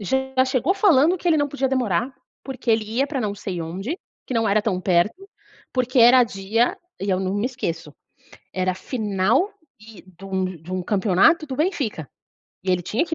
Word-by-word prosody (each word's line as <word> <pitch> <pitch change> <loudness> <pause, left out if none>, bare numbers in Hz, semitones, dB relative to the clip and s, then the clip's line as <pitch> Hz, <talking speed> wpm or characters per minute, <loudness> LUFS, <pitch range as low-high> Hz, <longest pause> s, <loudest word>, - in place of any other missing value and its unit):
já 265 +5 0
chegou 260 +8 +1
falando 350 -4 +4
que 350 - -2
ele 325 - +4
não 290 -1 +1
podia 270 -1 -1
demorar, 245 -2 0 0.3
porque 260 -3 -4
ele 220 -1 +2
ia 235 +6 -1
pra 280 -2 -3
não 210 -3 -1
sei 185 -4 -5
onde, 195 - -4 0.3
que 255 - -4
não 225 -2 +1
era 205 +2 +3
tão 205 -4 -1
perto, 190 - 0 0.4
porque 255 0 0
era 245 +2 +7
dia 220 +3 0 0.2
e 195 - -3
eu 185 -1 +1
não 190 0 -2
me 205 +4 0
esqueço. 165 - -5 0.6
Era 185 0 0
final 220 - 0 0.3
e 215 -2 -14
de 185 +1 -15
um 190 -1 -1
de 185 - -3
um 160 - -16
de 175 - -9
um 185 -1 -2
campeonato 210 - +3
do 265 - -4
Benfica, 270 - -2 0.6
e 190 - 0
ele 180 -1 +1
tinha 220 - 0
que 330 -1 -4
220 Hz, 200 wpm, -22 LUFS, 190-265 Hz, 0.6 s, era